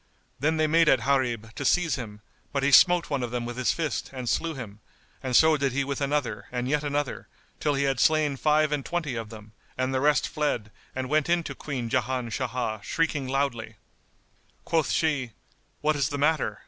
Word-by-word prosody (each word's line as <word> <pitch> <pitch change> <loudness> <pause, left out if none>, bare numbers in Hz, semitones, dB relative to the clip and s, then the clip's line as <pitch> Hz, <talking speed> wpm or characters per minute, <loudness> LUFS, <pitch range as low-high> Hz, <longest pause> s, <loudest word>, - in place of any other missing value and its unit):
Then 155 +4 +1
they 155 - +3
made 165 +1 +4
at 130 - +4
Gharib 120 -4 0
to 145 - -5
seize 165 +1 +2
him; 105 -4 -6 0.3
but 140 -2 -1
he 140 - +3
smote 175 +2 +6
one 140 -2 0
of 120 - -2
them 120 0 -3
with 120 0 -5
his 125 0 +1
fist 160 -3 -2
and 130 -2 -6
slew 165 +6 0
him, 110 -6 -8 0.4
and 130 -2 -2
so 160 +2 +6
did 135 -2 0
he 140 +1 +1
with 140 +1 -4
another 135 -8 -1
and 125 0 -2
yet 150 +2 0
another, 145 -1 -2 0.3
till 150 -2 +1
he 140 - +1
had 135 -1 0
slain 155 -2 +3
five 150 +2 +2
and 145 -2 -1
twenty 165 -5 -2
of 115 -2 -5
them 105 -1 -12 0.3
and 130 +1 -1
the 130 - +1
rest 150 +1 +3
fled 135 -8 -2 0.2
and 130 0 -2
went 155 +3 +1
in 170 0 +2
to - - -5
Queen 130 -5 -4
Jan 125 0 -1
Shah, 120 -4 -2
shrieking 150 +2 -1
loudly. 130 -5 -2 0.9
Quoth 160 -4 +1
she, 140 -8 0 0.5
"What 155 +1 +2
is 140 -2 0
the 145 - -3
matter?" 145 -7 +1
135 Hz, 205 wpm, -26 LUFS, 125-150 Hz, 0.9 s, smote